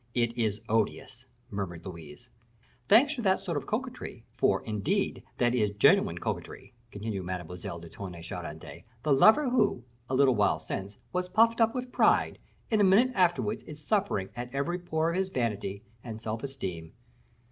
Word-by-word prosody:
"It 120 -1 +1
is 110 -3 -1
odious!" 110 -1 -1 0.3
murmured 90 -4 -5
Louise. 85 +3 -10 0.6
"Thanks 270 +8 +6
to 260 - -4
that 190 -3 +3
sort 185 -4 -4
of 145 - -3
coquetry, - - -4
for, - - +2
indeed, 105 -3 -1 0.2
that 120 0 +2
is 105 -4 +1
genuine 100 - +4
coquetry," - - -5 0.2
continued 100 -2 -4
Mademoiselle 90 -1 -5
de 85 0 -10
Tonnay 85 0 -8
Charente; 80 -2 -8 0.2
"the 150 - +3
lover 220 - +6
who, 210 - +2 0.3
a 130 - 0
little 135 -1 +5
while - - +2
since, 100 +1 -6 0.2
was 180 0 -1
puffed 230 +4 +4
up 225 +2 +3
with 250 0 -4
pride, - - +3 0.3
in 215 -2 +3
a - - +6
minute 205 +7 +5
afterwards 170 - +1
is 150 -1 -9
suffering 190 - 0
at 120 0 -6
every 170 +6 -1
pore 165 -2 0
of 175 - -2
his 190 0 0
vanity 105 - -2 0.2
and 110 -2 -7
self 110 0 -4
esteem. 95 -12 -6
120 Hz, 170 wpm, -29 LUFS, -, 0.6 s, Thanks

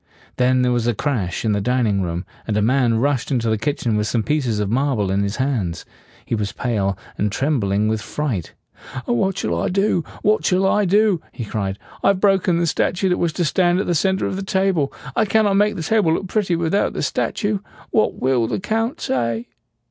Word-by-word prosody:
Then 125 0 +3
there 125 - +2
was 120 -1 0
a 120 - +1
crash 115 -8 -2
in 110 - +2
the 100 -1 0
dining 115 -4 +1
room, 85 0 -3 0.2
and 105 -2 0
a - - +2
man 120 -1 +2
rushed 135 +1 0
into 120 -5 0
the 110 - +1
kitchen 120 -2 -1
with 105 0 0
some 115 -1 0
pieces 130 -7 0
of 105 - 0
marble 125 -6 +1
in 100 +1 +1
his 100 +1 -1
hands. 120 -11 -2 0.4
He - - -4
was 105 -3 -1
pale, 100 -6 -1 0.2
and 105 0 +1
trembling 105 -6 +1
with 110 0 0
fright. 120 - -3 0.5
"What 180 +11 0
shall 85 0 -1
I - - 0
do? 195 -2 +1 0.2
What 210 +1 +3
shall 185 +1 +2
I 205 +2 +3
do?" 200 -2 +3
he 120 - -6
cried. 100 -2 -3 0.2
"I - - +2
have 195 -1 +3
broken 190 -3 +3
the 170 - +1
statue 180 +3 0
that 180 - +1
was 170 - +1
to 175 - 0
stand 175 +2 +2
at - - -1
the 175 - 0
center 190 +4 +1
of 190 - -2
the - - -3
table. 190 -6 +1 0.2
I 220 - +3
cannot 210 -1 +3
make 210 +1 +3
the 165 - -4
table 170 -4 +2
look 190 - -3
pretty 190 -2 0
without 170 +4 0
the - - -3
statue. 205 -2 -1 0.3
What 215 - +2
will 125 -3 +1
the 120 - -2
Count 225 +5 -1
say?" 115 -2 -1
135 Hz, 215 wpm, -21 LUFS, -, 0.5 s, Then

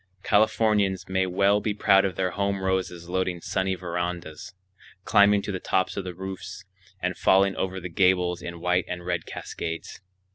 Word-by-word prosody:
Californians 105 -3 +2
may 95 0 0
well 100 +3 +2
be 105 -2 -1
proud 95 -1 +4
of 95 -3 -2
their 90 0 0
home 100 0 -1
roses 95 -2 -2
loading 90 -1 -1
sunny 95 +2 -1
verandas, 90 -1 -5 0.5
climbing 100 0 +4
to - - -3
the 95 - -3
tops 95 +1 0
of 100 - -3
the 90 -1 -6
roofs 95 +1 -7 0.4
and 90 0 0
falling 95 0 +4
over 95 0 -2
the 90 - -6
gables 90 0 +2
in 85 -1 -7
white 90 +1 +1
and 90 -1 -6
red 90 -2 -2
cascades. 80 +2 -6
95 Hz, 170 wpm, -26 LUFS, 90-95 Hz, 0.5 s, proud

